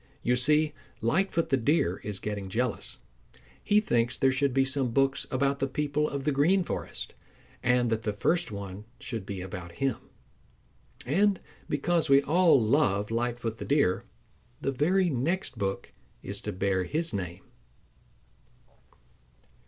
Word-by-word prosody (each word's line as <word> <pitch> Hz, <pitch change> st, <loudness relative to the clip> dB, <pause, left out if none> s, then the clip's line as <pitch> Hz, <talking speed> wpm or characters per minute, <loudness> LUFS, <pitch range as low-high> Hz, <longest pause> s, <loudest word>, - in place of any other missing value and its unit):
You 125 Hz, -, +3 dB
see, 150 Hz, +4 st, +3 dB, 0.3 s
Lightfoot 165 Hz, -, +1 dB
the 135 Hz, -, +3 dB
Deer 115 Hz, -, +1 dB
is 105 Hz, -2 st, -5 dB
getting 100 Hz, -1 st, -4 dB
jealous. 120 Hz, +3 st, -2 dB, 0.7 s
He 210 Hz, 0 st, +4 dB
thinks 120 Hz, -, +1 dB
there 135 Hz, -, +3 dB
should 140 Hz, +1 st, +1 dB
be 135 Hz, +1 st, +3 dB
some 135 Hz, -1 st, +1 dB
books 135 Hz, +3 st, +1 dB
about 140 Hz, +1 st, 0 dB
the 135 Hz, -, +1 dB
people 150 Hz, +2 st, 0 dB
of 140 Hz, -1 st, -4 dB
the 150 Hz, -, +1 dB
Green 165 Hz, +8 st, +3 dB
Forest, -, -, -5 dB, 0.5 s
and 125 Hz, -1 st, +2 dB
that 110 Hz, 0 st, 0 dB
the 110 Hz, -, -1 dB
first 165 Hz, -, 0 dB
one 100 Hz, 0 st, -7 dB
should 110 Hz, -6 st, -5 dB
be 95 Hz, -2 st, -4 dB
about 90 Hz, -2 st, -7 dB
him. 135 Hz, +1 st, -1 dB, 1.1 s
And 195 Hz, +8 st, +2 dB, 0.3 s
because 160 Hz, +2 st, +1 dB
we 140 Hz, 0 st, +6 dB
all 165 Hz, -1 st, +5 dB
love 110 Hz, -4 st, +2 dB
Lightfoot 120 Hz, -1 st, -2 dB
the -, -, -5 dB
Deer, 140 Hz, -11 st, +2 dB, 0.6 s
the 135 Hz, -, -1 dB
very 175 Hz, +7 st, +2 dB
next 155 Hz, +9 st, -1 dB
book 95 Hz, 0 st, -3 dB, 0.3 s
is -, -, -4 dB
to -, -, -4 dB
bear 95 Hz, 0 st, 0 dB
his 160 Hz, -, -1 dB
name. 90 Hz, -2 st, -4 dB
130 Hz, 145 wpm, -28 LUFS, 105-150 Hz, 1.1 s, we